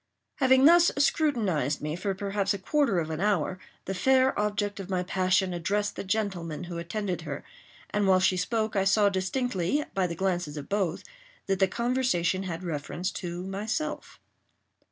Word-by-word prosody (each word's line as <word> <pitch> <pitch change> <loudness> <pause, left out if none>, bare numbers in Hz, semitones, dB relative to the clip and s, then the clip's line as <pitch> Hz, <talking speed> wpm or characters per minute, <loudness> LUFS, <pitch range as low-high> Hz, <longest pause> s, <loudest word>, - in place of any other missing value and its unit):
Having 260 -1 +5
thus 345 +2 +7
scrutinized 215 - +1
me 150 +1 -3
for 195 +2 -2
perhaps 200 0 -1
a - - -3
quarter 270 +1 +1
of 160 -2 -1
an 160 +2 -3
hour, 190 -3 +1 0.3
the 195 - -3
fair 260 +7 +3
object 205 -1 -1
of 195 -1 -7
my 185 -1 0
passion 185 0 +1
addressed 205 +4 -1
the - - -4
gentleman 185 -6 -2
who 175 -1 -5
attended 180 +1 -3
her, 145 -3 -6 0.5
and 205 -1 +1
while 185 -1 +5
she 185 0 +3
spoke, 215 +4 -1
I 195 - +3
saw 205 +1 +4
distinctly, 195 - -1
by 190 -2 +1
the 170 - -5
glances 175 -4 -1
of 140 - -6
both, 195 -4 -1 0.4
that 195 -1 0
the 190 - +4
conversation 235 -6 0
had 170 +2 -5
reference 170 +3 -3
to 175 -1 -5
myself. 220 +11 -4
195 Hz, 170 wpm, -28 LUFS, 175-210 Hz, 0.5 s, thus